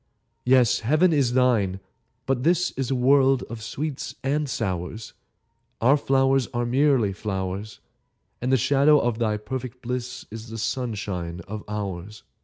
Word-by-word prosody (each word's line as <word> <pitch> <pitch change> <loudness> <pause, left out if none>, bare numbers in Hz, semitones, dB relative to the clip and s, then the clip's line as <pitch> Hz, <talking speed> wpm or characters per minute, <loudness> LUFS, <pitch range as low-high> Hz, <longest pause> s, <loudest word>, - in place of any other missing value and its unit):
Yes, 125 -2 +4
Heaven 155 +9 +3
is 135 -5 +2
thine; 115 -7 +2 0.5
but 130 -2 0
this 175 +5 +2
Is 130 -2 -3
a 135 - +1
world 135 +1 +4
of 115 -1 -6
sweets 140 +5 -4
and 145 +2 0
sours; 100 -1 -4 0.7
Our 130 +5 +5
flowers 135 -2 +2
are 120 0 0
merely 130 -4 +2
flowers, 100 +1 -4 0.6
And 125 +2 0
the 130 - +5
shadow 140 +4 +4
of 120 -2 -1
thy 110 -2 +1
perfect 125 +3 -6
bliss 125 0 -4
Is 110 +1 -8
the 115 - -6
sunshine 100 -8 -3
of 105 +4 -7
ours. 100 -1 -5
120 Hz, 145 wpm, -24 LUFS, 105-135 Hz, 0.7 s, Our